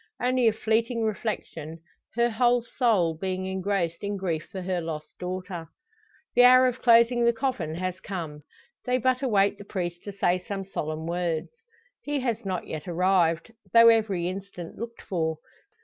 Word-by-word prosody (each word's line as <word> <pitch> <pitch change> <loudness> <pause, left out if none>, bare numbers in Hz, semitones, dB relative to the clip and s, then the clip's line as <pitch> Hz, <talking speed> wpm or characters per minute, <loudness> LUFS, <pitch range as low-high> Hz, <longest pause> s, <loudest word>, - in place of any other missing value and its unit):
Only 250 -1 +2
a - - +6
fleeting 225 +2 0
reflection, 195 -7 -3 0.4
her 235 0 +2
whole 240 +1 +3
soul 220 -10 +2
being 185 +2 -3
engrossed 190 -2 -2
in 205 0 -2
grief 170 -5 -2
for 190 -3 -5
her 180 -1 -1
lost 155 -2 -5
daughter. 180 -2 -5 0.7
The 245 - +6
hour 255 0 +7
for 255 - -17
closing 235 0 +5
the 235 - +5
coffin 225 - -2
has 185 +1 -3
come. 160 -6 -6 0.4
They 250 0 +1
but 255 +1 +1
await 205 -5 +2
the - - -8
priest 175 -3 -4
to 205 - -5
say 185 -2 +1
some 195 +2 -5
solemn 155 -4 -4
words. 170 -2 -2 0.5
He 290 -1 -2
has 235 -4 -2
not 185 -2 -2
yet 155 +1 -6
arrived, 175 +1 +2 0.2
though 230 0 +9
every 210 -6 +2
instant 185 -2 -7
looked 235 +1 -7
for. 160 -4 -1
195 Hz, 165 wpm, -26 LUFS, 175-230 Hz, 0.7 s, though